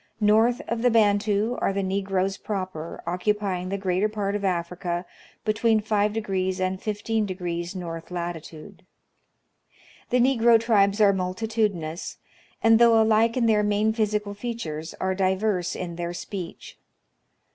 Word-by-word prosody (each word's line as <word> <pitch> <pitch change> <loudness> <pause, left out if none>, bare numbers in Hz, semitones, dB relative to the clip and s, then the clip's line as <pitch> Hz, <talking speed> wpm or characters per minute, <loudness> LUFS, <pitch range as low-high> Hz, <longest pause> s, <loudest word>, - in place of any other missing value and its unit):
North 225 +5 +3
of 235 -1 -2
the 245 - +4
Bantu 210 +1 +2
are - - +2
the 195 0 -1
Negroes 195 0 -1
proper, 185 -7 -5
occupying 185 +1 -1
the 200 - -2
greater 190 +2 0
part 205 -2 -2
of 205 - -3
Africa 175 -1 -2 0.4
between 220 +1 +2
5° 205 -3 -1
and 185 0 -1
15° 195 -5 -2
north 165 -2 -6
latitude. 170 -3 -7 1.3
The 250 - +2
negro 235 -2 +5
tribes 205 -3 +2
are 200 -1 +6
multi 185 +3 -2
tudinous, 195 -7 -2 0.5
and, 225 0 +6
though 230 -1 +6
alike 220 +2 +3
in 240 - +2
their 215 -2 +4
main 210 +1 +1
physical 210 -2 -1
features, 200 -8 -5
are 190 0 0
diverse 190 0 0
in 170 -2 -5
their 175 0 -4
speech. 180 -1 -7
200 Hz, 135 wpm, -25 LUFS, 180-220 Hz, 1.3 s, are